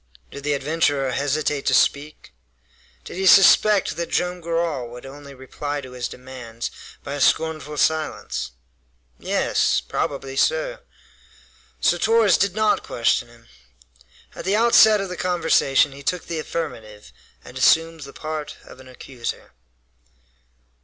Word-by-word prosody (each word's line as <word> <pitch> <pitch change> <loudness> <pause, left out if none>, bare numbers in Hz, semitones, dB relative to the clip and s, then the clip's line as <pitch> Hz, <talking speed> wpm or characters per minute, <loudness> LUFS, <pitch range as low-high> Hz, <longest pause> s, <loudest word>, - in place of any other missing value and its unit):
Did 140 - -9
the 145 0 0
adventurer 145 -2 0
hesitate 145 +2 -1
to - - +4
speak? 145 - 0 0.7
Did - - -9
he 190 0 0
suspect 200 +2 +5
that 170 0 -3
Joam 180 0 -1
Garral 165 -7 -2
would 120 +1 -11
only 140 +1 -11
reply 145 +3 -5
to 130 -2 -10
his 125 -1 -4
demands 125 -3 -8 0.3
by 140 - -6
a 145 - -4
scornful 155 -1 0
silence? 155 - -1 0.7
Yes! - - +1
Probably 135 - -4
so. - - 0 1.0
So 175 - +2
Torres 220 -3 +3
did 195 -1 +1
not 215 -1 +2
question 120 0 0
him. 120 0 -20 0.9
At - - -8
the 195 +2 +1
outset 220 -2 +5
of 195 - -5
the 180 - -6
conversation 160 -6 +2
he 140 +1 -11
took 180 +5 -2
the 165 -2 -4
affirmative, 110 - -6 0.3
and - - -12
assumed 165 0 +3
the 140 -1 -9
part 155 0 -6
of 130 - -14
an 130 - -14
accuser. 125 -1 -7
150 Hz, 140 wpm, -22 LUFS, 130-175 Hz, 1.0 s, suspect